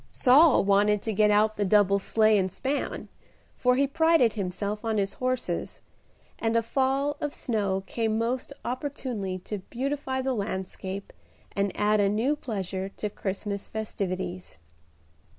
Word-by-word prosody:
Saul 285 Hz, +4 st, +5 dB
wanted 205 Hz, +1 st, +3 dB
to 220 Hz, -, -2 dB
get 210 Hz, +1 st, +4 dB
out 215 Hz, +1 st, +3 dB
the 205 Hz, -, +1 dB
double 200 Hz, 0 st, +4 dB
sleigh 215 Hz, +2 st, +3 dB
and 190 Hz, -2 st, +1 dB
span, 275 Hz, +8 st, -3 dB, 0.5 s
for 250 Hz, 0 st, +2 dB
he 275 Hz, +2 st, +3 dB
prided 320 Hz, -4 st, +3 dB
himself 200 Hz, +1 st, -3 dB
on 225 Hz, -1 st, 0 dB
his 195 Hz, -1 st, 0 dB
horses, 255 Hz, -1 st, -3 dB, 0.6 s
and 225 Hz, 0 st, 0 dB
a 230 Hz, -, +3 dB
fall 270 Hz, +4 st, 0 dB
of 295 Hz, -1 st, -3 dB
snow 200 Hz, -5 st, -1 dB
came 220 Hz, +1 st, -1 dB
most 240 Hz, +4 st, -2 dB
opportunely 245 Hz, -7 st, -3 dB
to 210 Hz, -, -4 dB
beautify 265 Hz, +1 st, -2 dB
the 265 Hz, 0 st, 0 dB
landscape 195 Hz, -2 st, -4 dB, 0.4 s
and 200 Hz, -1 st, 0 dB
add 210 Hz, +1 st, +3 dB
a 200 Hz, -1 st, +3 dB
new 230 Hz, +8 st, +1 dB
pleasure 195 Hz, -7 st, -4 dB
to 210 Hz, -, -3 dB
Christmas 200 Hz, +1 st, -4 dB
festivities. 185 Hz, -, -4 dB
215 Hz, 145 wpm, -27 LUFS, 200-255 Hz, 0.6 s, Saul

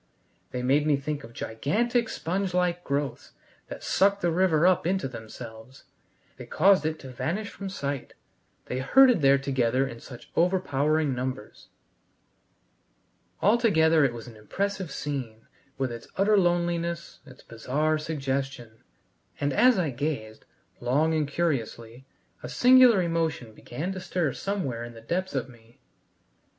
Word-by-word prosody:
They 125 Hz, 0 st, -4 dB
made 145 Hz, +4 st, +2 dB
me 145 Hz, -2 st, +3 dB
think 145 Hz, +1 st, -4 dB
of 115 Hz, -, -11 dB
gigantic 220 Hz, -, -1 dB
sponge 185 Hz, +2 st, -2 dB
like 180 Hz, -1 st, 0 dB
growths 140 Hz, -1 st, -3 dB, 0.3 s
that -, -, -9 dB
sucked 200 Hz, +1 st, +2 dB
the 175 Hz, -, +1 dB
river 170 Hz, -2 st, +3 dB
up 185 Hz, -2 st, +3 dB
into 190 Hz, -5 st, 0 dB
themselves. 115 Hz, +1 st, -10 dB, 0.5 s
They -, -, -10 dB
caused 190 Hz, -6 st, +4 dB
it 160 Hz, 0 st, -3 dB
to 135 Hz, -, -9 dB
vanish 190 Hz, -, -3 dB
from 200 Hz, -1 st, -7 dB
sight. 140 Hz, -7 st, -5 dB, 0.5 s
They 125 Hz, -, -3 dB
herded 245 Hz, -, +5 dB
there 140 Hz, 0 st, +5 dB
together 130 Hz, -1 st, 0 dB
in 115 Hz, -3 st, -9 dB
such 125 Hz, -1 st, -12 dB
overpowering 155 Hz, -4 st, +1 dB
numbers. 125 Hz, -3 st, -5 dB, 1.8 s
Altogether 165 Hz, -8 st, +4 dB
it 135 Hz, -, +3 dB
was 120 Hz, -1 st, -8 dB
an 115 Hz, -, -11 dB
impressive 190 Hz, -, -3 dB
scene, 130 Hz, -7 st, -5 dB, 0.3 s
with 135 Hz, -2 st, -1 dB
its 115 Hz, 0 st, -8 dB
utter 205 Hz, +2 st, +4 dB
loneliness, 175 Hz, -2 st, 0 dB
its 130 Hz, -, -15 dB
bizarre 150 Hz, +7 st, -1 dB
suggestion; 135 Hz, -6 st, -4 dB, 0.6 s
and 145 Hz, -1 st, 0 dB
as 250 Hz, -, +5 dB
I 165 Hz, -6 st, 0 dB
gazed, 120 Hz, -5 st, -4 dB, 0.3 s
long 145 Hz, +7 st, +1 dB
and 155 Hz, -2 st, 0 dB
curiously, 130 Hz, -5 st, -3 dB, 0.3 s
a -, -, -7 dB
singular 250 Hz, -5 st, +6 dB
emotion 165 Hz, -9 st, -2 dB
began 155 Hz, -, -5 dB
stir 175 Hz, -6 st, -1 dB
somewhere 145 Hz, -, -3 dB
in 120 Hz, 0 st, -9 dB
the 115 Hz, -, -11 dB
depths 180 Hz, +8 st, -3 dB
of 130 Hz, -2 st, -1 dB
me. 120 Hz, -2 st, -19 dB
150 Hz, 140 wpm, -27 LUFS, 125-180 Hz, 1.8 s, singular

